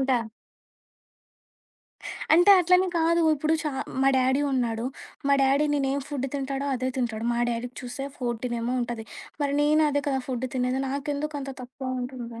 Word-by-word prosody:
ఇంకా 265 -1 +2 2.2
అంటే, 350 +4 +6
అట్లనికాదు. 345 -2 +3
ఇప్పుడు 310 +2 +1
చా 300 - -1 0.3
మా 270 - +5
డాడీ 260 +2 +3
ఉన్నాడు. 235 -2 0 0.4
మా 280 - +6
డాడీ 275 +3 +3
నేనేం 275 0 0
ఫుడ్ 275 -2 -2
తింటాడో 275 0 -2
అదే 255 +1 -1
తింటాడు. 230 -3 -2
మా 235 - -1
డాడీకి 240 +1 -4
చూస్తే 260 +3 -5
14 240 -1 -2
ఏమో 245 +2 -1
ఉంటది. 235 -2 -4 0.4
మరి 280 0 0
నేను 305 +1 +4
అదే 285 0 0
కదా! 265 -1 +1
ఫుడ్ 255 0 -2
తినేది. 255 +1 0
నాకెందుకు 290 +2 -3
అంత 270 0 -5
తక్కువ 255 +1 -6
ఉంటుంది? 240 -2 -7
265 Hz, 150 wpm, -26 LUFS, 245-285 Hz, 2.2 s, అంటే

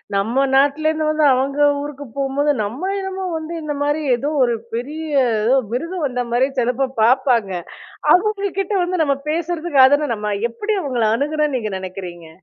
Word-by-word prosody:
நம்ம 230 +8 +1
நாட்டுலேருந்து 310 +3 +2
வந்து 310 -1 +2
அவங்க 275 +3 -1 0.2
ஊருக்கு 290 -1 -7
போகும்போது 280 +2 +1
நம்ம 265 - -3
என்னமோ 385 0 -4
வந்து, 315 +1 -6
இந்த 295 -1 -3
மாரி 295 +2 0
ஏதோ 280 +5 -3
ஒரு 240 -1 +1 0.2
பெரிய, 300 +6 -4 0.3
ஏதோ 250 +5 +4
மிருகம் 330 +6 -2
வந்த 250 -1 -2
மாதிரி 255 +3 +3
சிலநேரம் 250 +2 0
பாப்பாங்க. 240 -4 +3 0.6
அவுங்க 400 +1 +1
கிட்ட 390 +2 -3
வந்து 355 -2 0
நம்ம 280 -2 +1
பேசுறதுக்கு 330 -3 +2
அதான 285 0 +2
நம்ப 210 -1 -3 0.2
எப்படி 420 - -2
அவுங்கள 250 -6 0
அணுகணும்ன்னு 300 +1 0
நீங்க 215 -3 -4
நெனைக்கிறீங்க? 180 -3 -8
280 Hz, 155 wpm, -20 LUFS, 245-315 Hz, 0.6 s, ஏதோ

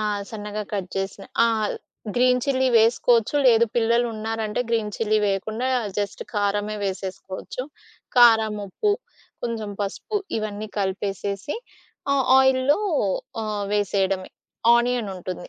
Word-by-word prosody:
ఆ! - - -1 0.3
సన్నగా 210 -1 -5
కట్ 190 -3 -2
చేసిన 195 0 -3 0.2
ఆహ్, 220 -2 +1 0.5
గ్రీన్ 250 0 +4
చిల్లీ 260 -2 +2
వేసుకోవచ్చు. 230 +2 +3
లేదు 235 -1 +6
పిల్లలు 235 +1 +3
ఉన్నారంటే 220 +1 -2
గ్రీన్ 220 -2 0
చిల్లీ 215 -1 +2
వేయకుండా 220 +6 -1 0.3
జస్ట్ 205 -1 -3
కారమే 205 +1 0
వేసేసుకోవచ్చు. 190 +5 -5 0.5
కారం, 220 -3 +6
ఉప్పు, 410 - 0 0.5
కొంచెం 220 -3 -3
పసుపు 410 - -3 0.2
ఇవన్నీ 215 0 -4
కలిపేసేసి 200 - -2 0.6
ఆహ్, 270 -2 +1
ఆయిల్‌లో 265 +6 +4 0.6
ఆహ్, 210 -1 -2
వేసేయడమే. 195 -2 0 0.4
ఆనియనుంటుంది. 200 -8 -1
215 Hz, 110 wpm, -24 LUFS, 200-240 Hz, 0.6 s, లేదు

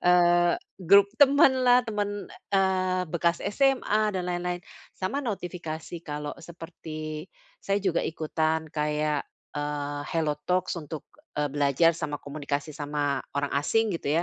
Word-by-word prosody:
eee, 175 -1 +5 0.2
grup 200 +3 +6
teman 280 -1 +7
lah, 245 0 +6
teman, 205 -2 -3 0.2
eee, 185 -1 +2
bekas 170 0 +1
SMA 215 -2 +2
dan 185 -1 -2
lain-lain. 175 0 -2 0.4
Sama 195 +10 -1
notifikasi 175 - -5
kalau 150 -2 -5
seperti 160 -1 -7 0.3
saya 200 - 0
juga 180 -3 +2
ikutan 160 0 -1
kayak, 150 -1 0 0.3
eee, 145 -1 -3
Hello 160 -2 +1 0.2
Talks 180 0 +1
untuk, 150 0 -7 0.3
eee, 150 0 +1
belajar 145 +3 +4
sama 155 -3 -3
komunikasi 145 +1 -4
sama 145 -1 -1 0.2
orang 140 0 -1
asing 210 +10 +2
gitu 150 +4 +1
170 Hz, 125 wpm, -27 LUFS, 150-190 Hz, 0.4 s, teman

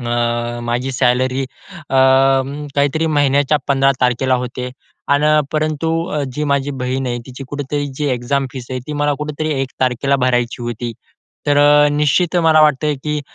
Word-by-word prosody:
अ, 120 0 -1
माझी 120 +3 -2
सॅलरी 130 +1 +1 0.5
अ, 135 - +1 0.8
काहीतरी 145 +3 +1
महिन्याच्या 145 -1 +2
15 135 0 +3
तारखेला 130 +1 +2
होते 125 0 -5 0.4
आणि 145 +1 +2 0.3
परंतु 155 0 -1 0.4
जी 150 +4 -2
माझी 140 0 0
बहीण 130 -1 -3
आहे, 120 0 -2
तिची 130 +1 -9
कुठेतरी 145 0 -3
जी 145 +2 -2
एक्झाम 135 +3 -1
फीस 125 -3 -7
आहे 130 - -2
ती 150 - -5
मला 145 0 0
कुठेतरी 150 +1 -3
1 130 - -3
तारखेला 130 +2 +1
भरायची 125 -1 0
होती. 120 0 -4 0.5
तर 145 0 +3
अ, 145 0 +5
निश्चित 150 +4 +1
मला 160 -2 +4
वाटते, 150 0 +2
की 150 +2 -3
135 Hz, 155 wpm, -18 LUFS, 125-145 Hz, 0.8 s, अ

